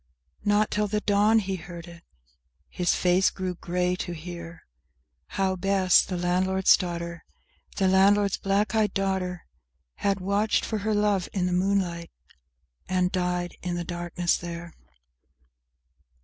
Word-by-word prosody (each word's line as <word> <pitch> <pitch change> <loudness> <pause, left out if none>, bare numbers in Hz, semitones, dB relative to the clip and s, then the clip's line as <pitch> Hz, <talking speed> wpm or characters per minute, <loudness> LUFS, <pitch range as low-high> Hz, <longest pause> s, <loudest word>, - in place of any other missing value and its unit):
Not 205 0 +2
till 210 0 0
the 210 +1 -1
dawn 205 +2 +3
he 195 -3 -1
heard 170 0 -9
it, 170 0 -13 0.7
his 175 -1 0
face 180 +1 +3
grew 185 -1 -4
grey 180 +1 -1
to 175 - -4
hear 170 0 -9 0.7
How 190 -1 +1
Bess, 190 0 +4
the 180 - -4
landlord's 185 +2 +3
daughter, 170 -2 -5 0.5
The 195 - +2
landlord's 200 +1 +4
black 200 +2 0
eyed 215 -1 +1
daughter, 190 -2 -2 0.5
Had 200 -1 0
watched 200 +3 +1
for 220 - -2
her 215 +1 -1
love 205 -3 +1
in 185 -3 0
the 180 - 0
moonlight, 180 -2 0 0.8
and 185 -1 +1
died 180 -1 -2
in 175 -1 -3
the 175 - -3
darkness 175 0 -1
there. 170 0 -7
185 Hz, 135 wpm, -26 LUFS, 175-200 Hz, 0.8 s, Bess